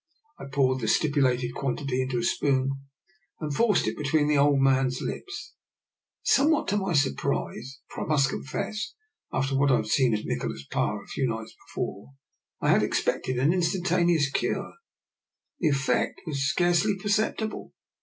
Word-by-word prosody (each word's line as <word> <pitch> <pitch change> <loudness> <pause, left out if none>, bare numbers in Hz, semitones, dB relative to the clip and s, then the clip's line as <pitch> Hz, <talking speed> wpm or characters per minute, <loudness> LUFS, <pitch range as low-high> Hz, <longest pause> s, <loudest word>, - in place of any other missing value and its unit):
I - - -7
poured 130 -1 +1
the 110 - -2
stipulated 130 -3 +2
quan 135 -2 -2
tity 135 -3 -1
into 130 -1 -2
a 120 - -1
spoon 135 +1 +1 0.7
and 150 -3 -3
forced 225 +6 +2
it - - -1
between 150 0 +1
the 150 -1 +3
old 140 -1 +4
man's 135 -1 +2
lips. 400 +4 -6 0.7
Somewhat 310 +3 +3
to 205 - +1
my 190 -3 -1
surprise 135 - -1
— - - -64
for - - -5
I - - -6
must 140 -3 +3
confess, 200 +9 -4 0.4
after 135 +1 0
what 140 +1 +3
I - - +6
had 110 - 0
seen 120 +1 +2
of 105 - -4
Nikola's 70 0 -3
power - - -1
a - - -19
few 135 - -1
nights 110 -1 -5
before, 100 +8 -5 0.5
I - - 0
had - - +4
expected 130 -1 0
an 140 +7 +3
instantaneous 175 -4 +2
cure - - -2 0.4
— - - -61
the 170 - +2
effect 140 -2 0
was 140 -4 -1
scarcely 175 - +2
perceptible. 215 +2 -1
140 Hz, 165 wpm, -27 LUFS, 130-175 Hz, 0.7 s, I